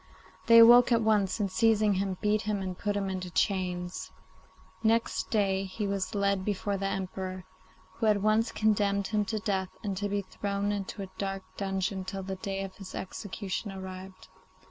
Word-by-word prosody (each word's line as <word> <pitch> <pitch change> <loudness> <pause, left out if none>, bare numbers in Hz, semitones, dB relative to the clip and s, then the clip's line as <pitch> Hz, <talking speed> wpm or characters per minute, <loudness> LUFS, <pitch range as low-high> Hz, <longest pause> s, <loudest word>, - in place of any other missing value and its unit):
They 230 0 +8
awoke 240 +2 +9
at 230 -1 +4
once, 210 -2 +2
and, 200 -2 0
seizing 215 +1 +3
him, 190 -1 -1
beat 210 0 +2
him 210 -1 -1
and 185 -1 -4
put 205 +2 -2
him 195 -1 -1
into 185 -1 -4
chains. 180 -1 -1 0.7
Next 230 +1 +1
day 195 -3 +1
he 195 +3 -4
was 200 0 -2
led 200 -1 +1
before 200 0 -1
the 195 0 -2
Emperor, 185 -1 -4 0.5
who 225 - +1
at 210 -1 +4
once 215 +2 +3
condemned 205 -2 +1
him 210 -1 +1
to 220 - -2
death 195 -3 -1
and 200 -2 -2
to 205 +1 -2
be 200 0 -1
thrown 200 +1 -2
into 200 0 -4
a 190 - -8
dark 195 -1 -3
dungeon 195 -1 -2
till 190 +1 -5
the 190 0 -5
day 195 +1 -3
of 195 -1 -8
his 195 -2 -9
execution 195 +1 -5
arrived. 190 0 -9
200 Hz, 180 wpm, -29 LUFS, 190-210 Hz, 0.7 s, awoke